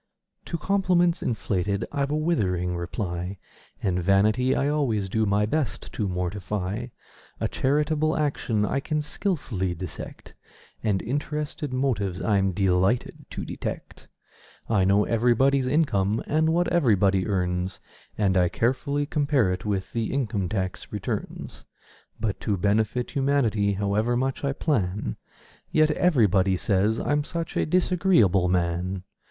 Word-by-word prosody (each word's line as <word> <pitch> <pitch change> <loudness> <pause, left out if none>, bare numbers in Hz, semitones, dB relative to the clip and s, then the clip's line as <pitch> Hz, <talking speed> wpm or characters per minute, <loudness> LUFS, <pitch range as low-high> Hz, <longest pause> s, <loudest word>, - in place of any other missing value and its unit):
To 170 - -3
compliments 180 -1 +2
inflated 100 -3 -1
I've 140 -1 -1
a 150 - 0
withering 90 - 0
reply; 90 +1 -4 0.5
And 90 -2 +1
vanity 105 +8 +3
I 140 - +1
always 130 -10 0
do 110 +2 +1
my 100 +1 +2
best 150 +4 -2
to 105 - -1
mortify; 95 +4 -3 0.5
A - - 0
charitable 150 +3 +1
action 125 -8 0
I 140 - 0
can 150 +2 -2
skilfully 135 - -2
dissect: 90 0 -8 0.5
And 105 -4 +1
interested 145 +3 -3
motives 110 -9 -1
I'm 100 -3 +2
delighted 95 +4 +1
to - - -5
detect. - - -6 0.6
I 105 -4 +2
know 100 +2 +4
everybody's 125 +3 +3
income 115 -8 +1
and 160 +1 +2
what 175 +1 +2
everybody 100 - +3
earns, 90 -2 -1 0.4
And 100 -3 +2
I 90 -1 +4
carefully 135 - 0
compare 140 - +1
it 90 - -6
with 100 -2 -2
the 115 -1 -1
income 110 -9 -1
tax 95 -2 -3
returns; - - -5 0.6
But 105 -2 -2
to 100 -2 -1
benefit 110 +5 0
humanity, 120 -8 +1
however 105 +4 0
much 135 +2 -1
I 140 -1 0
plan, 105 - -1 0.5
Yet 155 0 +4
everybody 105 - +3
says 105 +4 +1
I'm 145 0 +1
such 165 +1 -5
a - - +1
disagreeable 170 - +3
man! 90 +1 -1
110 Hz, 130 wpm, -25 LUFS, 95-145 Hz, 0.6 s, know